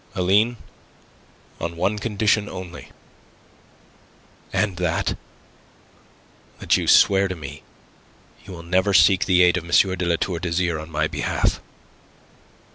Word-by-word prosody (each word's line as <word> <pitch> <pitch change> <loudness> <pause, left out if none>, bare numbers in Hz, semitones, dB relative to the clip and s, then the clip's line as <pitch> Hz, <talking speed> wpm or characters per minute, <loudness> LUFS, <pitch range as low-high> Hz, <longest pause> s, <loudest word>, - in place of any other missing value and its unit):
"Aline, 105 +6 +2 1.0
on 85 0 -4
one 100 +5 -1
condition 105 -1 0
only." 90 -2 -9 1.6
"And 100 -4 -1
that?" 85 -2 -1 1.4
"That - - +1
you - - -2
swear 100 0 +5
to 95 - -5
me 75 -2 -9 0.8
you 95 - -11
will 85 -1 -10
never 95 +3 +1
seek 90 +3 +5
the 90 -1 +4
aid 90 +1 +3
of 90 - -4
M. 85 - -12
de 95 0 +2
La 85 - +2
Tour 85 0 -3
d'Azyr 85 -1 -1
on 80 +1 -9
my 75 -1 -1
behalf." - - -2
90 Hz, 125 wpm, -22 LUFS, 85-95 Hz, 1.6 s, swear